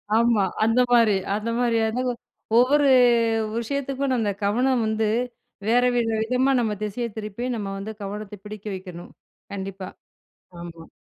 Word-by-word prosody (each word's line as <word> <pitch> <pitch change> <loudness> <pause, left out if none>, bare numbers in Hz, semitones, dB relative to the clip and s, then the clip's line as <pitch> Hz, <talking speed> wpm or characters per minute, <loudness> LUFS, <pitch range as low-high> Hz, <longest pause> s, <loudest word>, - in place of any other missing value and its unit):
ஆமா. 230 -3 +3 0.2
அந்த 225 +3 +3
மாரி 230 -3 +5 0.2
அந்த 215 +2 -3
மாதிரியா 230 -2 +2
தாங்க, 255 0 0 0.5
ஒவ்வொரு 280 +3 +4 0.7
விஷயத்துக்கும் 275 +2 -2
நம்ம 220 -4 0
கவனம் 245 +4 +2
வந்து, 220 0 0 0.6
வேற 245 +1 +4
வேற 235 -1 +1
விதமா 255 +4 +1
நம்ம 220 -3 0
திசைய 225 +3 -3
திருப்பி, 215 +3 -5
நம்ம 205 -3 -4
வந்து 205 +3 -6
கவனத்த 210 +1 -6
பிடிக்க 210 -1 -9
வைக்கணும். 180 -2 -9 0.4
கண்டிப்பா. 195 -1 -6 0.7
ஆமா. 165 -1 -10
225 Hz, 130 wpm, -24 LUFS, 205-245 Hz, 0.7 s, மாரி